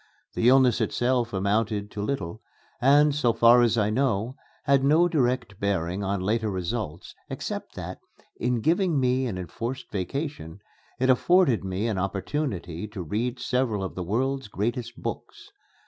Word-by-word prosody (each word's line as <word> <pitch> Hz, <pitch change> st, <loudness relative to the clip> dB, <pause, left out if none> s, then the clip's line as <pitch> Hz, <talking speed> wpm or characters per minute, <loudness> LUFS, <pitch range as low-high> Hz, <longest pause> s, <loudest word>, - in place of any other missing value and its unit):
The 120 Hz, -, +3 dB
illness 130 Hz, -3 st, +5 dB
itself 120 Hz, -1 st, 0 dB
amounted 105 Hz, +1 st, 0 dB
to 105 Hz, -, -5 dB
little, 105 Hz, -4 st, -3 dB, 0.4 s
and, 145 Hz, +3 st, +5 dB
so 125 Hz, -5 st, +2 dB
far 120 Hz, +2 st, +6 dB
as 120 Hz, -1 st, +3 dB
I 105 Hz, -1 st, +2 dB
know, 120 Hz, -1 st, 0 dB, 0.3 s
had 140 Hz, -1 st, +3 dB
no 155 Hz, +5 st, +5 dB
direct 125 Hz, -, 0 dB
bearing 95 Hz, -1 st, -1 dB
on 100 Hz, 0 st, -1 dB
later 110 Hz, +3 st, 0 dB
results, 95 Hz, -2 st, -4 dB, 0.2 s
except -, -, -5 dB
that, -, -, -6 dB, 0.4 s
in 125 Hz, -1 st, 0 dB
giving 170 Hz, -, +2 dB
me 130 Hz, 0 st, +1 dB
an 100 Hz, -6 st, -4 dB
enforced 115 Hz, +9 st, -5 dB
vacation, 100 Hz, -, -4 dB, 0.4 s
it 130 Hz, +1 st, +4 dB
afforded 165 Hz, -, +3 dB
me 95 Hz, +3 st, -2 dB
an 105 Hz, -5 st, -1 dB
opportunity 95 Hz, -, -3 dB
to 100 Hz, -3 st, -6 dB
read 115 Hz, -, -2 dB
several 125 Hz, -5 st, 0 dB
of 95 Hz, -, -4 dB
the 95 Hz, -, -5 dB
world's 130 Hz, +7 st, -1 dB
great 110 Hz, +4 st, -2 dB, 0.2 s
books. -, -, -7 dB
115 Hz, 150 wpm, -26 LUFS, 100-130 Hz, 0.4 s, far